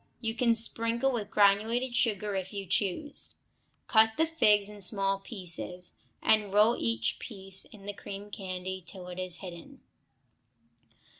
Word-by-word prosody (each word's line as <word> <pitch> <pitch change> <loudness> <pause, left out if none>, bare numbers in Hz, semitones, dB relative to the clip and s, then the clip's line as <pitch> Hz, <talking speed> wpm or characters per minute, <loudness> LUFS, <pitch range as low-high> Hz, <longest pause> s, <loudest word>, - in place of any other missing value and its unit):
You 225 -2 -2
can 235 -1 +3
sprinkle 230 +3 +1
with 215 -5 -3
granulated 220 +5 +3
sugar 210 -4 +1
if 190 -1 -3
you 200 -1 -4
choose. 200 - -1 0.5
Cut 220 -1 +5
figs 215 -11 +4
in 210 -1 -10
small 195 0 +1
pieces, 180 -3 -5 0.3
and 215 -2 +3
roll 210 +4 +5
each 115 0 0
piece 195 -3 -5
in 205 -3 -14
the 205 - -4
cream 200 +1 -8
candy 185 -1 -4
till 180 0 -8
it 180 0 -6
is 185 -1 -2
hidden. 170 -2 -10
205 Hz, 140 wpm, -30 LUFS, 190-225 Hz, 0.5 s, Cut